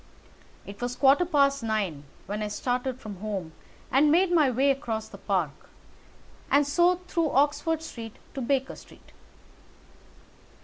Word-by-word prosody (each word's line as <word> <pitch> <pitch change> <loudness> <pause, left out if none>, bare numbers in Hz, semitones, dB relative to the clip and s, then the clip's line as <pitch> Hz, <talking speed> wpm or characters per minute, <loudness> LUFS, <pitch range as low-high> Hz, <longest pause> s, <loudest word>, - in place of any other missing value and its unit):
It 200 +2 -10
was 245 0 -2
a - - -21
quarter 280 +5 +5
past 280 -4 +2
nine 200 -10 -2 0.2
when 205 +3 -4
I 210 - -1
started 250 +4 -2
from 210 -5 -8
home 195 -5 -4 0.4
and 290 +3 +4
made 355 +3 +3
my 310 -6 +4
way 265 +3 +3
across 225 -6 -3
the - - -12
Park, 180 -8 -2 0.8
and 285 +1 +4
so 345 +5 +3
through 335 -3 0
Oxford 300 +4 +1
Street 225 -8 -8 0.2
to 270 - -4
Baker 265 +1 0
Street. - - -17
260 Hz, 145 wpm, -27 LUFS, 215-290 Hz, 0.8 s, quarter